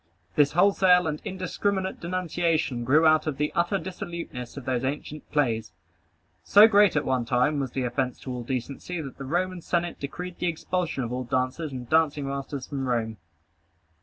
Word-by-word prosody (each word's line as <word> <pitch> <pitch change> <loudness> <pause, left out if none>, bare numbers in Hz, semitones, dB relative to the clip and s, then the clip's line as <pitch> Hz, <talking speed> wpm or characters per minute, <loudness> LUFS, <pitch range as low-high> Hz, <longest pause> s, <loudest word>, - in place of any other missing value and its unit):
This 145 -1 +3
wholesale 180 0 +5
and 150 -1 -2
indiscriminate 190 0 -2
denunciation 170 -7 -1
grew 150 +7 +4
out 155 0 +4
of 145 -3 -2
the 150 +1 0
utter 175 +4 +1
dissoluteness 170 -8 -6
of 135 - -7
those 125 -1 -1
ancient 150 +2 -4
plays. 115 -7 0 0.7
So 205 - +8
great 205 -4 +5
at 150 - +1
one 130 -2 +1
time 125 +5 +1
was 135 -3 -3
the 130 - -1
offence 125 0 -1
to 130 - -5
all 125 - -4
decency, 135 +8 -4
that 140 -4 -7
the 135 - -5
Roman 180 +4 -1
Senate 175 +1 -1
decreed 180 +5 -6
the 180 - 0
expulsion 170 -3 -2
of 120 +1 -4
all 130 +1 -2
dancers 130 +5 -1
and 125 -2 -6
dancing 150 -2 +2
masters 140 -1 -4
from 135 -2 -4
Rome. 110 -3 -1
150 Hz, 175 wpm, -26 LUFS, 130-175 Hz, 0.7 s, So